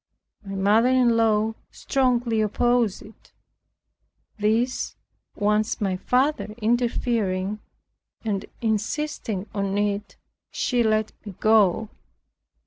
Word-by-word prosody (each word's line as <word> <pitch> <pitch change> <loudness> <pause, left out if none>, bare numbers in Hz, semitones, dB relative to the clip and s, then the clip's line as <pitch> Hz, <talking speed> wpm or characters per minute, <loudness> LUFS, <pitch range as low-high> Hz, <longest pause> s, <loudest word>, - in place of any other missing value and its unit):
My 195 -1 -6
mother 210 +5 +3
in 250 -2 +4
law 220 -1 +2 0.2
strongly 245 -4 0
opposed 230 0 +1
it. 215 - -18 1.1
This 225 +4 0 0.4
once 210 +2 +1
my 195 -4 0
father 250 +2 0
interfering, 220 -4 0 0.7
and 200 -3 -1 0.2
insisting 220 -2 -2
on 200 -1 -1
it, 205 0 -1 0.3
she 245 -2 0
let 215 -1 +1
me 205 -3 -9
go. 215 -1 +3
215 Hz, 95 wpm, -24 LUFS, 205-240 Hz, 1.1 s, in